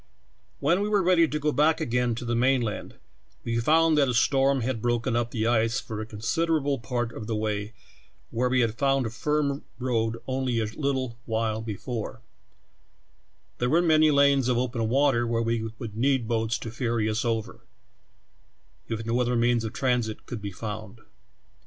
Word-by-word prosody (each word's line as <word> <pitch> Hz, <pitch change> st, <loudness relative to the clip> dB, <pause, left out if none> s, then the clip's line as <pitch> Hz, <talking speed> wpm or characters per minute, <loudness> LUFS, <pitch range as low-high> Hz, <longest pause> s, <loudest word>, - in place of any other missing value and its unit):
"When 170 Hz, +7 st, +2 dB
we 205 Hz, -, -1 dB
were 205 Hz, -2 st, +2 dB
read}^ 170 Hz, -3 st, +4 dB
to 150 Hz, -, 0 dB
go 150 Hz, 0 st, 0 dB
back 155 Hz, +2 st, +3 dB
again 120 Hz, 0 st, 0 dB
to 120 Hz, -, -6 dB
the 120 Hz, -, -1 dB
main 125 Hz, +1 st, +3 dB
land, 110 Hz, -2 st, -5 dB, 0.5 s
we 115 Hz, 0 st, -1 dB
found 160 Hz, +4 st, +4 dB
that 140 Hz, -, +4 dB
a 125 Hz, -, 0 dB
storm 135 Hz, +2 st, +3 dB
had 115 Hz, -1 st, -2 dB
broken 120 Hz, 0 st, 0 dB
up 120 Hz, -1 st, 0 dB
the 110 Hz, -2 st, -2 dB
ice 115 Hz, +1 st, +2 dB
for 110 Hz, -2 st, -6 dB
a 110 Hz, -, -6 dB
considerable 140 Hz, +6 st, 0 dB
part 120 Hz, 0 st, -2 dB
of 110 Hz, -, -7 dB
the 115 Hz, -, -1 dB
way 105 Hz, 0 st, -2 dB, 0.6 s
where 125 Hz, +2 st, 0 dB
we 125 Hz, 0 st, +3 dB
had 115 Hz, -1 st, -1 dB
found 135 Hz, -2 st, +2 dB
a 110 Hz, -, -3 dB
firm 145 Hz, +2 st, -1 dB
road 115 Hz, -3 st, -1 dB
only 130 Hz, -2 st, -1 dB
a 110 Hz, -, 0 dB
little 130 Hz, 0 st, -2 dB
while 110 Hz, -1 st, -1 dB
before; 115 Hz, +3 st, -5 dB, 1.4 s
there 125 Hz, -, +1 dB
were 165 Hz, -, +4 dB
many 155 Hz, -2 st, +4 dB
lanes 140 Hz, -3 st, +4 dB
of 125 Hz, -2 st, +2 dB
open 120 Hz, -2 st, -1 dB
water 130 Hz, -2 st, +2 dB
where 115 Hz, 0 st, 0 dB
we 115 Hz, -1 st, -1 dB
would 115 Hz, -4 st, -7 dB
need 130 Hz, 0 st, +1 dB
boats 115 Hz, -1 st, 0 dB
to 115 Hz, -, -6 dB
ferr^^ 115 Hz, -1 st, -1 dB
us 110 Hz, +1 st, -1 dB
over, 115 Hz, -1 st, -3 dB, 1.2 s
if 115 Hz, 0 st, -3 dB
no 115 Hz, +2 st, +1 dB
other 125 Hz, 0 st, +1 dB
means 120 Hz, 0 st, +2 dB
of 110 Hz, -, -3 dB
transit 125 Hz, -4 st, -1 dB
could 115 Hz, -3 st, -6 dB
be 100 Hz, -1 st, -5 dB
found. 110 Hz, +2 st, -7 dB
120 Hz, 185 wpm, -26 LUFS, 115-135 Hz, 1.4 s, read}^